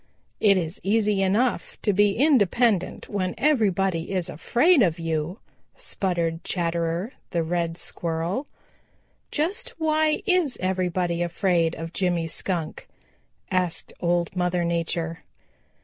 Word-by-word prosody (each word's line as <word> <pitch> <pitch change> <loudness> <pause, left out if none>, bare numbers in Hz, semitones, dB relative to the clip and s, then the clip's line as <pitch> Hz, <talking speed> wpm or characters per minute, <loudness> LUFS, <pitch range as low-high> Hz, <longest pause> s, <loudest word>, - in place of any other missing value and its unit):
"It 200 -2 +5
is 170 -1 -3
easy 210 -1 +2
enough 210 +7 0
to 205 - +2
be 205 +1 +4
independent 235 - +2
when 185 -3 -2
everybody 195 - +1
is 185 -3 -1
afraid 255 - +3
of 170 -6 +2
you," 165 +2 -2 0.4
sputtered 175 - -2
Chatterer 170 +4 -1 0.2
the 170 -2 0
Red 170 0 -1
Squirrel. 170 - -2 0.8
"Just 400 +11 -2
why 310 -1 +2
is 360 - +2
everybody 180 -2 0
afraid 170 -1 +1
of 165 +1 -7
Jimmy 175 -3 0
Skunk," 165 0 -3 0.6
asked 180 -2 -1
Old 175 0 0
Mother 180 -1 +1
Nature. 165 0 -2
180 Hz, 115 wpm, -25 LUFS, 170-215 Hz, 0.8 s, It